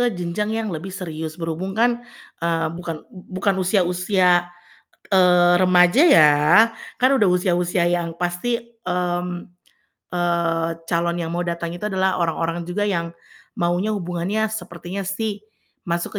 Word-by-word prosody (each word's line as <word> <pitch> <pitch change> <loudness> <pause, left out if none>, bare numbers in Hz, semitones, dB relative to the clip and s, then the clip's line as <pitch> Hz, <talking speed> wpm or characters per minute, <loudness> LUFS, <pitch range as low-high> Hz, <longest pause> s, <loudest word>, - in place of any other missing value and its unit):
ke - - +3
jenjang 175 +4 -2
yang 225 -1 -2
lebih 165 +4 -5
serius. 160 -4 -6
Berhubung 165 +3 -3
kan, 240 +1 +2 0.4
eee, 165 -1 0
bukan 165 -2 -6
bu 185 - -13 0.2
bukan 200 -2 +2
usia 185 +1 +2
usia, 180 -1 +2 0.6
eee, 180 -1 +5
remaja 180 - +5
ya, 155 - +7 0.7
kan 255 +1 +4
udah 205 -7 +3
usia-usia 180 -1 +1
yang 170 -1 -1
pasti, 180 +7 -1 0.3
mmm, 180 0 -1 0.9
eee, 170 -1 0 0.2
calon 170 0 0
yang 165 - -4
mau 175 +1 -1
datang 170 -1 -3
itu 210 - -6
adalah 190 0 +1
orang-orang 165 0 -1
juga 190 +4 -3
yang 170 -4 -1 0.5
maunya 175 +5 0
hubungannya 180 +4 -2
sepertinya 180 -1 -6
sih 205 +1 -3 0.5
masuk 170 +4 -2
175 Hz, 135 wpm, -21 LUFS, 170-190 Hz, 0.9 s, ya